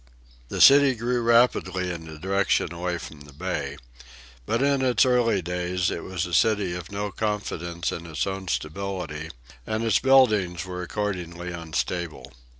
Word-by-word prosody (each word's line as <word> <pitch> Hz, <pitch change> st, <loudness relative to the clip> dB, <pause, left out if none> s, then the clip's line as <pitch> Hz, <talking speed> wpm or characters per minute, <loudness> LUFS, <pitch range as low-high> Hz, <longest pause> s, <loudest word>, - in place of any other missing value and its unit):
The -, -, -2 dB
city 140 Hz, -1 st, +8 dB
grew 120 Hz, +2 st, -1 dB
rapidly 115 Hz, -6 st, +2 dB
in 80 Hz, -2 st, -7 dB
the 80 Hz, -1 st, -9 dB
direction 95 Hz, +1 st, 0 dB
away 90 Hz, +1 st, -2 dB
from 80 Hz, -3 st, -10 dB
the 75 Hz, 0 st, -13 dB
bay. 75 Hz, -4 st, -4 dB, 0.7 s
But 115 Hz, +4 st, +1 dB
in 140 Hz, -1 st, +2 dB
its 125 Hz, -2 st, +3 dB
early 120 Hz, -6 st, +2 dB
days 90 Hz, +1 st, -1 dB
it -, -, -4 dB
was 95 Hz, -1 st, -3 dB
a 90 Hz, -, -7 dB
city 105 Hz, -3 st, +2 dB
with 90 Hz, 0 st, -7 dB
no 100 Hz, 0 st, -3 dB
confidence 90 Hz, -6 st, -3 dB
in 85 Hz, 0 st, -6 dB
its 80 Hz, -2 st, -2 dB
own 95 Hz, -1 st, -4 dB
stability, 80 Hz, -2 st, -4 dB, 0.4 s
and 110 Hz, +1 st, -1 dB
its 110 Hz, -4 st, +3 dB
buildings 105 Hz, -, +3 dB
were 90 Hz, -1 st, -5 dB
accordingly 90 Hz, -3 st, -4 dB
unstable. 85 Hz, 0 st, -4 dB
90 Hz, 155 wpm, -25 LUFS, 85-110 Hz, 0.7 s, city